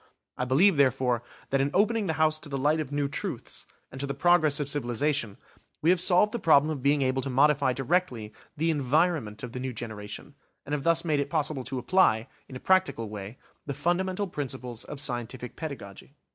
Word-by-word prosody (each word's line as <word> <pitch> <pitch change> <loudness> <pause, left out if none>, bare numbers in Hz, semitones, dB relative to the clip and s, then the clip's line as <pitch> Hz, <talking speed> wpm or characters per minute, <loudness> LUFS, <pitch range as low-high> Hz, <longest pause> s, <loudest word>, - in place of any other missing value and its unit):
I 125 - -2
believe, 155 +8 +4
therefore, 130 -3 +2 0.3
that 135 0 +2
in 140 - +1
opening 215 +1 +2
the 160 - 0
house 155 0 +3
to 155 - -9
the 140 - -3
light 150 +4 +2
of 150 -3 -4
new 145 -1 0
truths, 140 - -5 0.2
and 135 - -7
to 140 - -2
the 140 - -3
progress 155 -1 +3
of 145 - -2
civilisation 135 -4 -1 0.5
we 165 - +5
have 180 -1 +2
solved 185 +4 +4
the 235 - -3
problem 155 -3 +4
of 145 -4 -4
being 140 +1 +2
able 130 0 0
to 135 - -3
modify 140 +1 +3
directly, 130 -7 -1 0.2
the 165 +2 +1
environment 145 -6 0
of 125 - -5
the 125 - -6
new 130 0 -4
generation, 110 +3 -7 0.3
and 145 - -5
have 150 - -1
thus 165 0 +2
made 155 -3 +1
it 140 0 -2
possible 150 -3 -1
to 130 - -4
apply, 125 -4 +2 0.2
in 130 - -9
a - - -6
practical 185 - +1
way, 105 +3 -8 0.3
the 140 - -3
fundamental 185 +6 0
principles 130 - -5
of 145 - -7
scientific 125 -1 -2
pedagogy. 140 -5 -8
140 Hz, 200 wpm, -27 LUFS, 125-160 Hz, 0.5 s, we